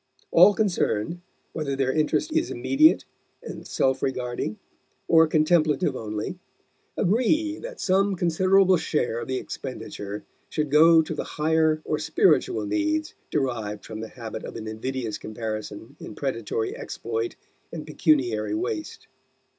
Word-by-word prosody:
All 205 Hz, -, +7 dB
concerned, 175 Hz, -, 0 dB, 0.3 s
whether 145 Hz, -4 st, -2 dB
their 135 Hz, -1 st, +1 dB
interest 155 Hz, -, 0 dB
is 325 Hz, +1 st, +1 dB
immediate 310 Hz, +4 st, +3 dB, 0.4 s
and -, -, -8 dB
self 130 Hz, 0 st, +1 dB
regarding, 125 Hz, -5 st, -2 dB, 0.5 s
or 160 Hz, -1 st, +6 dB
contemplative 155 Hz, +1 st, +2 dB
only, 110 Hz, +10 st, -4 dB, 0.6 s
agree 305 Hz, -, +1 dB
that -, -, -8 dB
some 195 Hz, +1 st, +2 dB
considerable 185 Hz, +2 st, +4 dB
share 120 Hz, -7 st, -1 dB
of -, -, -6 dB
the 130 Hz, -, -1 dB
expenditure 105 Hz, -6 st, -6 dB, 0.3 s
should 150 Hz, -3 st, -2 dB
go 160 Hz, +2 st, +7 dB
to 160 Hz, -, -5 dB
the 150 Hz, -, -3 dB
higher 155 Hz, 0 st, +2 dB
or 155 Hz, -, -1 dB
spiritual 375 Hz, -, +2 dB
needs 315 Hz, -1 st, -1 dB, 0.2 s
derived 115 Hz, -7 st, -2 dB
from 110 Hz, -1 st, -7 dB
the 110 Hz, -, -5 dB
habit 110 Hz, -2 st, -7 dB
of -, -, -8 dB
an 110 Hz, -, -6 dB
invidious 115 Hz, 0 st, -4 dB
comparison 110 Hz, -1 st, -6 dB
in 105 Hz, -, -9 dB
predatory 115 Hz, -5 st, -2 dB
exploit 115 Hz, 0 st, -4 dB, 0.4 s
and 160 Hz, -2 st, -6 dB
pecuniary 120 Hz, -10 st, +1 dB
waste. 110 Hz, -2 st, -4 dB
150 Hz, 130 wpm, -25 LUFS, 115-180 Hz, 0.6 s, All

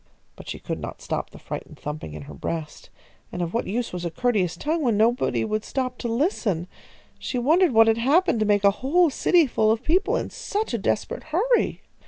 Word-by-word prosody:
But -, -, -11 dB
she -, -, -4 dB
could -, -, -5 dB
not -, -, -7 dB
stop -, -, -3 dB
the -, -, -13 dB
frightened -, -, -7 dB
thumping 150 Hz, -, -6 dB
in 75 Hz, -, -7 dB
her 75 Hz, -, -10 dB
breast, 155 Hz, -, -5 dB, 0.4 s
and 175 Hz, -, -3 dB
of 170 Hz, -, -4 dB
what 235 Hz, -, -1 dB
use 230 Hz, +2 st, -2 dB
was 180 Hz, -1 st, -4 dB
a 170 Hz, -, -1 dB
courteous 190 Hz, -4 st, 0 dB
tongue, 315 Hz, -, -1 dB
when 235 Hz, -7 st, +2 dB
nobody 235 Hz, +3 st, +2 dB
would 215 Hz, 0 st, -2 dB
stop 255 Hz, -2 st, -3 dB
to -, -, -3 dB
listen? 230 Hz, -, 0 dB, 0.5 s
She 255 Hz, -, -3 dB
wondered 320 Hz, +7 st, +4 dB
what 225 Hz, -1 st, +6 dB
had 225 Hz, 0 st, +2 dB
happened 280 Hz, +2 st, +3 dB
to 215 Hz, -, +2 dB
make 205 Hz, -1 st, +3 dB
a 200 Hz, -, +6 dB
whole 325 Hz, +5 st, +3 dB
city 340 Hz, +4 st, +4 dB
full 220 Hz, -4 st, +2 dB
of 225 Hz, +2 st, -1 dB
people 385 Hz, +7 st, +2 dB
in -, -, -2 dB
such 415 Hz, -, -3 dB
a 235 Hz, -, 0 dB
desperate 200 Hz, -, -2 dB
hurry. 405 Hz, +11 st, +1 dB
235 Hz, 215 wpm, -24 LUFS, 200-310 Hz, 0.5 s, what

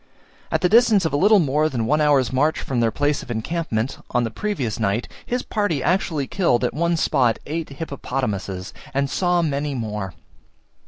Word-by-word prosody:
At -, -, +1 dB
the 180 Hz, -, +4 dB
distance 220 Hz, -2 st, +5 dB
of 160 Hz, -, -1 dB
a -, -, +2 dB
little 205 Hz, +8 st, +5 dB
more 155 Hz, -2 st, +2 dB
than 120 Hz, -6 st, -2 dB
one 150 Hz, +6 st, +2 dB
hour's 140 Hz, -4 st, +3 dB
march 150 Hz, +5 st, +2 dB
from 130 Hz, -3 st, -2 dB
their 115 Hz, -1 st, +3 dB
place 145 Hz, +5 st, 0 dB
of -, -, -12 dB
encampment 120 Hz, 0 st, -2 dB
on 120 Hz, -, +1 dB
the 115 Hz, -, -2 dB
previous 135 Hz, -, -3 dB
night, 105 Hz, +2 st, 0 dB, 0.2 s
his 245 Hz, +1 st, -1 dB
party 195 Hz, -, -1 dB
actually 160 Hz, -4 st, +1 dB
killed 130 Hz, -, +1 dB
at 125 Hz, -, 0 dB
one 170 Hz, +4 st, +1 dB
spot 125 Hz, -7 st, +2 dB
eight 160 Hz, +2 st, -4 dB
hippopotamuses, 125 Hz, -, -4 dB, 0.2 s
and 140 Hz, 0 st, 0 dB
saw 175 Hz, -2 st, +2 dB
many 145 Hz, -2 st, -1 dB
more. 105 Hz, -6 st, -4 dB
140 Hz, 180 wpm, -22 LUFS, 120-170 Hz, 0.2 s, distance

